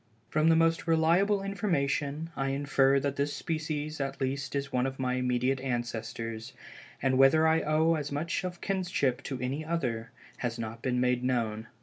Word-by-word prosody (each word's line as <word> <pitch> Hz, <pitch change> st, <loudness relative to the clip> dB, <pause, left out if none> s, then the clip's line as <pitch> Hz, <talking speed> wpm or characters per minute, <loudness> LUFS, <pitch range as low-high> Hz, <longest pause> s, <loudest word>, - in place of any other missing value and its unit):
From 155 Hz, +1 st, +3 dB
the 165 Hz, -, +6 dB
most 165 Hz, +1 st, +2 dB
reliable 175 Hz, +5 st, +3 dB
information, 160 Hz, -6 st, -1 dB
I 135 Hz, -, -1 dB
infer 140 Hz, 0 st, +3 dB
that 140 Hz, 0 st, -2 dB
this 145 Hz, +1 st, 0 dB
species 155 Hz, -2 st, -3 dB
at 135 Hz, 0 st, -3 dB
least 135 Hz, +1 st, -2 dB
is 140 Hz, -1 st, -3 dB
one 125 Hz, +1 st, +2 dB
of 135 Hz, 0 st, -5 dB
my 130 Hz, -1 st, -1 dB
immediate 125 Hz, +1 st, +1 dB
ancestors, 115 Hz, -3 st, -4 dB, 0.5 s
and 130 Hz, -1 st, +2 dB
whether 155 Hz, +4 st, +6 dB
I 160 Hz, 0 st, +3 dB
owe 155 Hz, +2 st, +3 dB
as 150 Hz, -3 st, -2 dB
much 160 Hz, +6 st, -2 dB
of 180 Hz, -1 st, -5 dB
kinship 180 Hz, -10 st, 0 dB
to 135 Hz, -2 st, -4 dB
any 130 Hz, +5 st, -2 dB
other, 125 Hz, -9 st, -2 dB, 0.3 s
has 120 Hz, -1 st, -3 dB
not 115 Hz, 0 st, -5 dB
been 125 Hz, -1 st, 0 dB
made 125 Hz, 0 st, +1 dB
known. 115 Hz, -3 st, -1 dB
140 Hz, 170 wpm, -29 LUFS, 125-160 Hz, 0.5 s, the